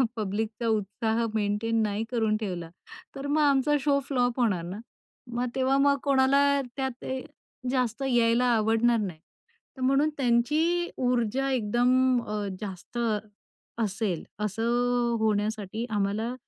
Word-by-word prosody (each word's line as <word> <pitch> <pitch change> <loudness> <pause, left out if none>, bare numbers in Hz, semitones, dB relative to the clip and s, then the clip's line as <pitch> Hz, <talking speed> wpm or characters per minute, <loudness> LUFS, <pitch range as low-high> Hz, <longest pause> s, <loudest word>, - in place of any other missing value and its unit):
पब्लिकचा 220 +2 -2
उत्साह 220 +2 0
मेंटेन 220 +2 0
नाही 210 +1 -1
करून 220 -3 +1
ठेवला, 180 -6 -4 0.5
तर 275 +1 -5
मग 300 +2 +2
आमचा 285 0 +3
शो 280 0 +2
फ्लॉप 245 -2 0
होणार 205 -8 +1
ना. 185 +4 -6 0.5
मग 240 +1 0
तेव्हा 265 +1 +2
मग 280 0 +4
कोणाला 280 +1 +3 0.2
त्यात 265 -2 -3
अ, 260 0 -3 0.5
जास्त 250 0 -1
यायला 240 -1 +3
आवडणार 225 +2 +3
नाही. 185 -7 -4 0.6
तर - - -8
म्हणून 275 +4 +3
त्यांची 300 +8 +2
ऊर्जा 250 +1 0
एकदम 250 +2 +2
अ, 210 -1 -3
जास्त 195 +3 -7 0.8
असेल, 205 -4 -1 0.2
असं 210 +1 -2 0.5
अ, - - 0
होण्यासाठी 215 0 -1
आम्हाला, 210 +3 -1
235 Hz, 125 wpm, -27 LUFS, 215-265 Hz, 0.8 s, मग